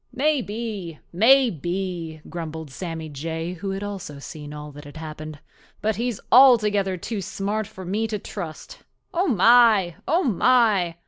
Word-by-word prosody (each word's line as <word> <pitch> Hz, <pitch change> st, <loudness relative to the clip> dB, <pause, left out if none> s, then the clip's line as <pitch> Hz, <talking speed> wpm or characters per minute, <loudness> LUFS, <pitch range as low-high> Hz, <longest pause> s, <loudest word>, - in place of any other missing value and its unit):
"Maybe, 225 Hz, -, -2 dB, 0.2 s
maybe," 180 Hz, -, +2 dB
grumbled 160 Hz, -3 st, -6 dB
Sammy 165 Hz, +1 st, -5 dB
Jay, 160 Hz, +4 st, -4 dB
who 195 Hz, +2 st, -4 dB
also 195 Hz, -7 st, -6 dB
had 140 Hz, -, -11 dB
seen 150 Hz, -2 st, -8 dB
all 150 Hz, 0 st, -8 dB
that 145 Hz, +1 st, -11 dB
had 145 Hz, +1 st, -11 dB
happened. 155 Hz, -1 st, -7 dB, 0.4 s
"But 215 Hz, -1 st, -1 dB
he's 235 Hz, -2 st, -2 dB
altogether 210 Hz, -7 st, +5 dB
too 210 Hz, +3 st, -4 dB
smart 200 Hz, +3 st, -3 dB
for 190 Hz, -4 st, -10 dB
me 210 Hz, +5 st, -1 dB
to 215 Hz, -1 st, -2 dB
trust. 195 Hz, -, -8 dB, 0.3 s
Oh, 360 Hz, +3 st, +1 dB
my! 225 Hz, -, +5 dB
oh, 340 Hz, +5 st, +2 dB
my! 215 Hz, -, +3 dB
195 Hz, 140 wpm, -24 LUFS, 160-225 Hz, 0.4 s, altogether